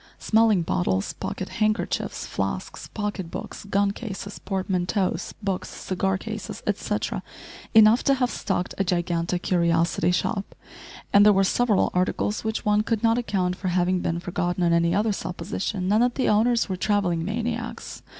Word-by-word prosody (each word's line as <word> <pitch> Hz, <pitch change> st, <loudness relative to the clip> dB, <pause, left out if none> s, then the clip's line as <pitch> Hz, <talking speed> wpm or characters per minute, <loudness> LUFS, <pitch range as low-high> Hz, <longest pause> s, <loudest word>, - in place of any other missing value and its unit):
Smelling 220 Hz, -5 st, +3 dB
bottles, 95 Hz, -, 0 dB
pocket -, -, -5 dB
handkerchiefs, 215 Hz, 0 st, -1 dB
flasks, -, -, -4 dB
pocket 205 Hz, -5 st, -4 dB
books, -, -, -7 dB
gun 200 Hz, 0 st, +1 dB
cases, 200 Hz, -2 st, -7 dB
portmanteaux, 190 Hz, 0 st, -1 dB, 0.3 s
books, 195 Hz, -2 st, -2 dB
cigar 190 Hz, 0 st, -1 dB
cases, -, -, -6 dB
etcetera, -, -, -2 dB, 0.5 s
enough 220 Hz, +2 st, +7 dB
to 275 Hz, -, +4 dB
have 250 Hz, -2 st, 0 dB
stocked 180 Hz, -3 st, -2 dB
a -, -, +3 dB
gigantic 175 Hz, -1 st, -1 dB
curiosity 170 Hz, -1 st, +2 dB
shop, 195 Hz, +3 st, -1 dB, 0.6 s
and 200 Hz, -, +8 dB
there 210 Hz, -, +7 dB
were 195 Hz, 0 st, +3 dB
several 215 Hz, +1 st, +2 dB
articles 185 Hz, +3 st, 0 dB
which 220 Hz, 0 st, -2 dB
one 210 Hz, 0 st, +3 dB
could 225 Hz, 0 st, -1 dB
not 230 Hz, +1 st, +3 dB
account 185 Hz, -6 st, -1 dB
for 185 Hz, -, -5 dB
having 180 Hz, 0 st, +1 dB
been 170 Hz, -1 st, -1 dB
forgotten 175 Hz, 0 st, -2 dB
on 170 Hz, -1 st, +3 dB
any 170 Hz, +1 st, +3 dB
other 210 Hz, +2 st, +2 dB
supposition 185 Hz, 0 st, -3 dB
than 215 Hz, +3 st, +4 dB
that 245 Hz, 0 st, +2 dB
the 260 Hz, -, 0 dB
owners 230 Hz, +3 st, +3 dB
were 190 Hz, -, -2 dB
travelling 185 Hz, -4 st, 0 dB
maniacs. 230 Hz, +3 st, -4 dB
195 Hz, 155 wpm, -25 LUFS, 180-215 Hz, 0.6 s, and